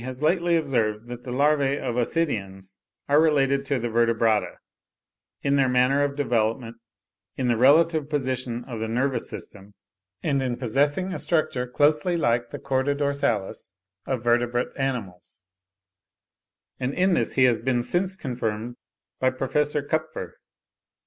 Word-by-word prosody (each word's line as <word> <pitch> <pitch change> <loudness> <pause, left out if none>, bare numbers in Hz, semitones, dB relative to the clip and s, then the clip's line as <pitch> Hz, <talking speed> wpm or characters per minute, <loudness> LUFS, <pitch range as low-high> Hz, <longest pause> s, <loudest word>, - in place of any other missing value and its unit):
has 130 +3 -6
lately 170 +1 +2
observed 115 -8 -1
that 120 0 -8
the 125 - -5
larvae 140 +1 +2
of 120 - -3
Ascidians 100 - -2 0.3
are 145 +2 +5
related 140 -3 +2
to 140 - +1
the 120 -1 -2
Vertebrata, 115 -2 +1 0.9
in 140 0 +2
their 135 -2 +3
manner 125 +3 +3
of 140 -1 -1
development, 115 -3 -1 0.6
in 130 - -1
the 120 - +3
relative 150 +4 +4
position 130 -4 -2
of 120 -3 -7
the 110 - -2
nervous 130 +4 -1
system, 100 -1 -10 0.5
and 140 -4 +1
in 125 -2 -2
possessing 145 - 0
a - - -4
structure 135 -6 0
closely 150 +6 +2
like 120 -5 +1
the - - -6
chorda 135 +1 0
dorsalis 120 -10 -2 0.3
of 130 -4 -2
vertebrate 120 +1 +1
animals; 100 -9 -4 1.3
and 130 +2 -2
in 185 +1 +3
this - - 0
he 130 - +3
has 120 -3 +4
been 120 0 0
since 185 +6 -1
confirmed 120 - -4 0.4
by 130 - +3
Prof. 130 0 -5 0.3
Kupffer. 155 - -3
130 Hz, 140 wpm, -25 LUFS, 115-145 Hz, 1.3 s, are